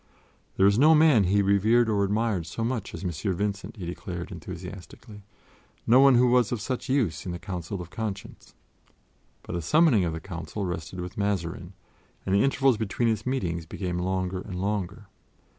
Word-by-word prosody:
There 95 - +4
was 100 +3 +4
no 155 +3 +7
man 150 -10 +5
whom 90 - 0
he 100 - +4
revered 110 +5 +3
or 105 -2 +1
admired 100 -4 0
so 115 - -4
much 115 -3 -3
as - - -8
M. 90 - -1 0.2
Vincent, 100 +4 -3
he 95 - -6
declared 85 0 -6
enthusiastically; 100 +4 -9 0.6
no 120 +3 +6
one 135 -1 +7
who 125 +1 +5
was 125 -3 +3
of 120 - -1
such 125 +4 -4
use 125 - 0
in 90 - -5
the 85 - -4
Council 90 0 -5
of 90 0 -8
Conscience. 105 -3 -6 0.9
But - - -7
the 85 - -2
summoning 140 - +4
of 85 -2 -1
the 80 - -4
Council 85 +2 -6
rested 85 0 -5
with 90 +3 -7
Mazarin, 95 -2 -2 0.5
and 95 - -1
the 100 - +4
intervals 135 -3 +3
between 110 +2 0
its 110 +1 -2
meetings 85 -11 -2
became 90 -1 -4
longer 95 0 -2
and 95 - -8
longer. 100 +1 -3
100 Hz, 185 wpm, -26 LUFS, 90-115 Hz, 0.9 s, no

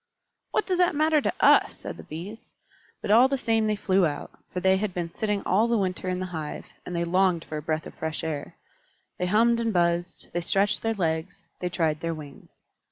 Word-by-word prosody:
"What - - 0
does 365 -2 0
that 355 -3 +3
matter 310 0 +3
to - - +1
us?" - - +5
said - - -7
the - - -8
Bees. 185 +8 -9 0.5
But - - 0
all 240 +4 +7
the 275 0 0
same 225 -3 +1
they 215 - +1
flew 190 -3 +2
out; 145 -1 -5 0.2
for 180 - -2
they 190 +1 +4
had 200 -2 -2
been 170 -2 -3
sitting 210 0 -1
all 210 +6 +3
the 235 -1 +2
winter 185 -2 -1
in 180 0 -1
the 185 - -2
hive, 155 -2 -5 0.2
and 180 - -4
they 170 - 0
longed 180 -1 +2
for 155 - -5
a - - -4
breath 155 +1 -2
of - - -9
fresh 160 +1 -4
air. 155 -3 -4 0.6
They 180 - 0
hummed 230 +4 +4
and 230 -1 0
buzzed, 175 -1 0
they 175 - 0
stretched 195 +4 +1
their 225 0 0
legs, 180 +2 -2
they 180 - -2
tried 160 -3 0
their 165 0 -2
wings. 145 -3 -12
185 Hz, 225 wpm, -26 LUFS, 165-215 Hz, 0.6 s, all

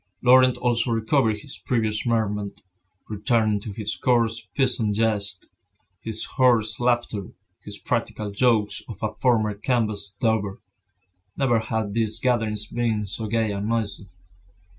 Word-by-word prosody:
Laurent 130 0 +6
also 120 -1 0
recovered 115 -1 +1
his 135 - -6
previous 110 -3 -1
merriment, 105 -3 -1 0.4
returning 110 0 +1
to 105 +1 -7
his 105 0 -4
coarse 115 -3 +1
peasant 120 -6 +2
jests, 105 -4 0 0.5
his 110 -1 -1
hoarse 120 -4 +2
laughter, 120 -5 0 0.4
his - - -5
practical 105 -1 -2
jokes 105 -1 +2
of 110 - -7
a 110 - -1
former 110 -4 +2
canvas 105 -3 -1
dauber. 110 -4 0 0.8
Never 120 -4 +2
had 110 -2 -2
these 110 -1 0
gatherings 110 -4 0
been 110 -1 -1
so 110 +3 -4
gay 110 0 0
and 100 +1 -3
noisy. 105 -4 -1
110 Hz, 130 wpm, -24 LUFS, 105-120 Hz, 0.8 s, Laurent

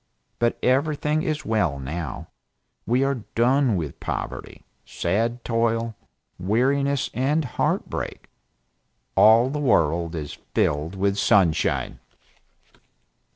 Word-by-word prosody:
But 120 0 +1
everything 150 +3 +1
is 150 -3 -2
well, 105 -10 +1
now 70 +2 -5 0.6
we 125 +3 +2
are 135 -5 -1
done 125 0 +3
with 80 -6 -4
poverty, - - -5 0.2
sad 115 +7 -1
toil, 115 -1 0 0.4
weariness 135 +8 +1
and 145 +5 +1
heart 125 - -1
break; - - -5 0.9
all 115 +4 +6
the 150 - -2
world 85 - +1
is 75 -3 -6 0.2
filled 75 +5 0
with 100 +1 0
sunshine." 95 -8 +2
115 Hz, 105 wpm, -24 LUFS, 90-135 Hz, 0.9 s, all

